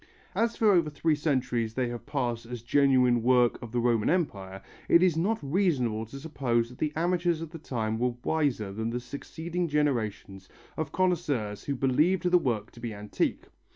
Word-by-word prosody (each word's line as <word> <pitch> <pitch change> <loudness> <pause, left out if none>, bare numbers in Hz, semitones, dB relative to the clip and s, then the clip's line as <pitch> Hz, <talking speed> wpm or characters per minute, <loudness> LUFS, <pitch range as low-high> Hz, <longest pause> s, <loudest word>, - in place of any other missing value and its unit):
As 230 0 +1
for 220 -2 +4
over 170 -5 +3
three 155 +2 +1
centuries 125 -7 -1
they 125 -2 0
have 120 -1 -7
passed 120 -5 -2
as 120 -2 -7
genuine 125 -2 +3
work 125 0 +3
of 120 - -8
the 120 - 0
Roman 115 -3 +2
Empire, 95 - -2 0.3
it 170 - +6
is 180 -4 +3
not 200 +8 +1
reasonable 135 - 0
to 135 +5 -9
suppose 125 -6 -1
that 125 - -14
the 150 - 0
amateurs 175 0 +1
of 165 -1 -7
the 165 - -8
time 110 -6 -2
were 125 0 0
wiser 135 -11 0
than 110 +2 -2
the 120 +1 -2
succeeding 165 +7 -4
generations 110 - -1 0.3
of 155 -2 -3
connoisseurs 155 - -1
who 140 - -1
believed 150 +8 +2
the 180 - +6
work 120 -9 -2
to - - -15
be 115 -2 -5
antique. 105 0 -2
130 Hz, 185 wpm, -28 LUFS, 115-160 Hz, 0.3 s, it